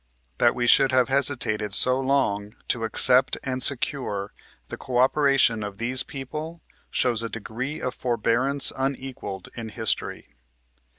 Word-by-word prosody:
That - - +3
we 120 - -1
should 135 +2 +5
have 130 0 +2
hesitated 120 -7 0
so 130 +1 +4
long 110 -7 -1
to 115 -2 0
accept 125 +4 +4
and 130 -1 -3
secure 125 -7 0 0.4
the - - -5
co 125 -1 -4
operation 135 -3 +3
of 100 -1 -6
these 125 +4 +1
people, 155 +4 -7 0.3
shows 120 -3 +1
a 115 - -4
degree 120 +6 -5
of 125 - -3
forbearance 125 +3 +1
unequalled 135 -7 -5
iu 115 -1 -6
history. 110 -1 -4
125 Hz, 135 wpm, -24 LUFS, 115-135 Hz, 0.4 s, should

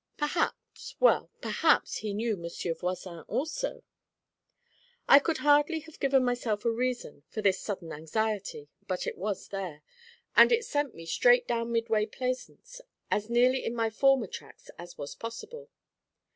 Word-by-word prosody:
Perhaps 295 +3 -2
well, - - +4
perhaps - - +2
he 215 - -4
knew 220 +2 -1
Monsieur 170 -1 -4
Voisin 180 0 -5
also. 320 - -3 1.2
I 280 - +9
could 315 +2 -1
hardly 295 +2 +3
have 320 0 -15
given 270 -2 +3
myself 240 -4 -1
a 235 - +3
reason 240 - -3
for 215 - -5
this 195 -2 +3
sudden 185 -6 -5
anxiety, 195 0 -3 0.2
but 185 -1 -2
it - - -3
was 200 +1 -4
there, 180 -7 -5 0.5
and - - +8
it 465 -1 +3
sent 290 -3 -1
me 165 - -10
straight - - +4
down 230 0 -1
Midway 225 -2 +1
Plaisance, 255 - -5 0.3
as 210 +2 0
nearly 250 +2 +3
in 235 - -3
my 225 -1 0
former 270 +1 +3
tracks - - -11
as 175 0 -10
was 145 - -6
possible. 470 - -8
230 Hz, 150 wpm, -29 LUFS, 195-280 Hz, 1.2 s, I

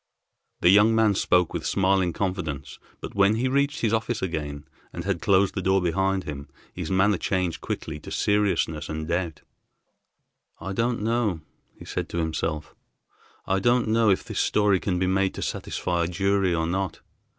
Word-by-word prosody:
The 90 - +6
young 105 +3 +6
man 110 -2 +4
spoke 90 -2 +2
with - - -3
smiling 95 -2 +2
confidence, 85 -7 -4 0.2
but - - -7
when 100 +1 +4
he 125 +3 0
reached 140 +2 0
his 115 -2 +1
office 110 +1 0
again 75 -5 -4 0.3
and - - -6
had 95 -4 -2
closed 100 -2 +3
the 95 - -2
door 95 +1 +3
behind 95 +2 0
him, 70 -1 -7 0.2
his 90 -3 -5
manner 95 +1 +2
changed 90 -3 -1
quickly 75 -1 -5
to - - -10
seriousness 100 -7 0
and 80 0 -4
doubt. 85 -2 -2 1.2
"I 95 +4 -5
don't 115 +1 0
know," 110 -7 0 0.4
he - - -12
said - - -4
to - - -5
himself, 80 -1 -2 0.7
"I 95 0 +1
don't 120 +2 +2
know 110 0 +3
if 95 - +2
this - - -4
story 105 -3 +3
can 90 -1 -1
be 95 - +1
made 95 +1 +1
to - - -4
satisfy 85 -1 -2
a - - -2
jury 95 +1 +1
or 80 0 0
not. 95 +3 -2
95 Hz, 175 wpm, -25 LUFS, 85-105 Hz, 1.2 s, The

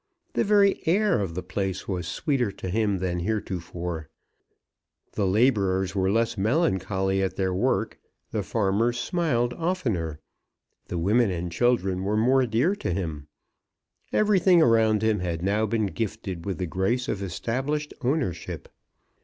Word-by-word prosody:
The - - +2
very 200 -1 +4
air 195 - +3
of 95 -5 -3
the 90 - -3
place 95 +1 -3
was 90 -3 -3
sweeter 130 - 0
to 95 - -6
him 105 0 +1
than 90 -1 -2
heretofore. 85 -5 -4 1.0
The 100 -3 0
labourers 95 -3 +2
were 95 -1 +1
less 115 +1 +1
melancholy 95 - +1
at 95 -1 -1
their 95 -1 0
work. 90 - 0 0.3
The - - -1
farmers 115 +3 0
smiled 125 -6 0
oftener. 115 - -2 0.7
The 90 - -3
women 105 +7 +3
and 90 -1 -3
children 95 -3 +1
were 105 +2 0
more 130 +3 +3
dear 125 - +2
to - - -2
him. 80 -5 -4 0.8
Everything 190 -4 +4
around 110 -6 +4
him 110 -2 +2
had 85 -2 -3
now 105 +3 +1
been 110 0 0
gifted 100 -4 -4
with 95 -4 -2
the 90 - -2
grace 95 - -1
of 100 - -2
established 135 - -2
ownership. 130 - -2
105 Hz, 145 wpm, -26 LUFS, 95-120 Hz, 1.0 s, very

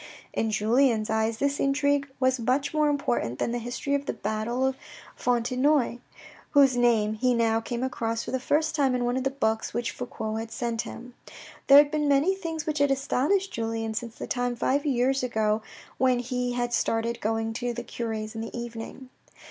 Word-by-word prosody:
In 225 - 0
Julien's 220 +1 +2
eyes 220 0 +1
this 280 +2 0
intrigue 285 0 +1
was 260 -1 +2
much 255 +6 0
more 305 -1 +3
important 265 - -1
than - - -1
the 240 - -1
history 245 +4 -3
of 280 0 -1
the - - -1
battle 230 +4 -2
of 265 0 0 0.4
Fontenoy, 250 +2 +1 0.5
whose 275 -3 +6
name 230 -3 +3
he 250 +3 +1
now 225 -1 +2
came 240 +1 -4
across 230 -3 -2
for - - -6
the 260 - 0
first 305 +5 +1
time 275 -4 +2
in 245 -1 0
one 245 +1 0
of 260 - -1
the 270 - +1
books 225 -5 -1
which 240 -1 -1
Fouque 220 -3 -4
had 225 0 -5
sent 230 0 -2
him. 245 +1 -9 0.5
There 275 - +9
had 290 0 +7
been 300 -1 0
many 285 +7 +3
things 325 -4 -4
which 305 -2 -1
had 285 0 +4
astonished 285 +8 +1
Julien 225 -1 -2
since 230 0 -5
the - - -6
time 245 -1 -1
five 280 +5 0
years 265 0 +2
ago 220 -3 0 0.4
when 255 -1 +3
he 245 0 -2
had 240 0 -1
started 230 +1 0
going 225 +1 -1
to 245 +1 -2
the 240 0 -5
cure's 220 -2 -4
in 225 - -5
the 225 +1 -6
evening. 235 +2 -7
245 Hz, 195 wpm, -27 LUFS, 225-275 Hz, 0.5 s, There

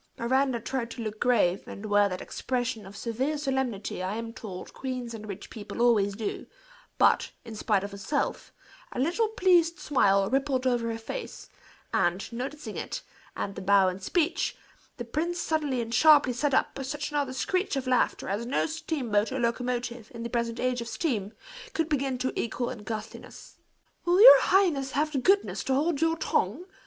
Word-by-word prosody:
Miranda 260 +1 +1
tried 240 0 -3
to 235 - -6
look 215 -1 -5
grave, 200 -7 +2
and 200 - -8
wear 205 -1 +3
that 185 -1 -5
expression 245 -5 -3
of 195 +1 -11
severe 260 +6 -2
solemnity 265 -10 -2
I 185 +3 -2
am 230 0 -5
told 205 -7 -8
queens 255 -3 -5
and 215 -1 -8
rich 195 - -8
people 215 +1 -8
always 210 -5 +3
do; 215 0 -4 0.5
but, - - +4 0.2
in 225 -2 -8
spite 210 -2 +1
of 200 - -5
herself, 200 +9 -2 0.4
a - - -8
little 350 - +2
pleased 360 -5 +3
smile 200 - +3
rippled 265 +2 0
over 240 -2 +1
her 225 - -3
face; 340 - -7 0.4
and, 175 +6 0
noticing 275 +5 -5
it, - - -5 0.3
and 200 - -3
the 195 - -7
bow 195 0 +4
and 185 +1 -6
speech, 340 - 0 0.4
the 240 - -5
prince 335 +8 -2
suddenly 295 -6 0
and 230 0 -5
sharply 290 0 +6
set 275 +2 +1
up 270 - 0
such 295 +3 -4
another 285 -3 0
screech 365 +7 -1
of 270 -1 -2
laughter 255 -1 +1
as 205 +5 -2
no 260 - +1
steamboat 280 -10 -1
or 265 - -2
locomotive, 240 -1 -2
in 230 - -6
the 235 - -5
present 235 -1 -1
age 250 -1 0
of 235 - -6
steam, 230 - -2 0.4
could 325 -1 +1
begin 275 -4 0
to 260 +1 -2
equal 235 +1 -2
in 250 - -7
ghastliness. 215 0 -8 0.5
"Will 350 +2 +3
your - - +11
highness 315 -9 +2
have 305 +2 +1
the 280 - 0
goodness 390 +9 +2
to 265 - +1
hold 300 +1 +1
your 325 0 +2
tongue?" 280 - 0
250 Hz, 180 wpm, -28 LUFS, 220-290 Hz, 0.5 s, your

